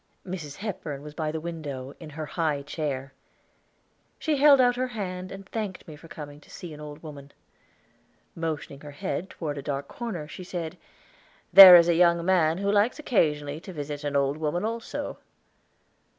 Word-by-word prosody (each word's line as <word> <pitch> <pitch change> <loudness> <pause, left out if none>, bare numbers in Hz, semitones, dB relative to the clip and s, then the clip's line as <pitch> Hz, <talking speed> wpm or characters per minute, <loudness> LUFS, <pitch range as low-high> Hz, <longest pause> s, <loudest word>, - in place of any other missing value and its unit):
Mrs. 165 -6 -6
Hepburn 160 -9 -5
was 150 0 -9
by 155 -1 -2
the 160 - -3
window, 145 -5 -6
in 160 - -9
her 155 +1 -6
high 150 -3 -1
chair. 140 -3 -4 1.0
She 310 -2 0
held 280 0 +7
out 245 -1 +4
her 255 +1 -1
hand 185 -6 -5
and 195 0 -9
thanked 205 -5 -5
me 155 - -9
for 160 +3 -14
coming 145 -2 -10
to - - -21
see 170 -3 -9
an 150 - -11
old 150 +1 -9
woman. 145 -2 -10 1.0
Motioning 155 -4 -4
her 150 - -9
head 190 +6 -3
toward 145 -4 -5
a - - -5
dark 140 0 -4
corner, 195 -11 -6
she 180 - -9
said, 175 -3 -5 0.8
"There 190 -1 +13
is 170 -1 +7
a 170 - +4
young 170 0 +3
man 170 -3 +3
who 200 +1 0
likes 210 +4 +2
occasionally 150 - 0
to 185 +3 -10
visit 145 -1 -5
an 145 -1 -3
old 140 +1 +1
woman 160 +5 -1
also." 230 +1 -4
160 Hz, 180 wpm, -26 LUFS, 150-190 Hz, 1.0 s, There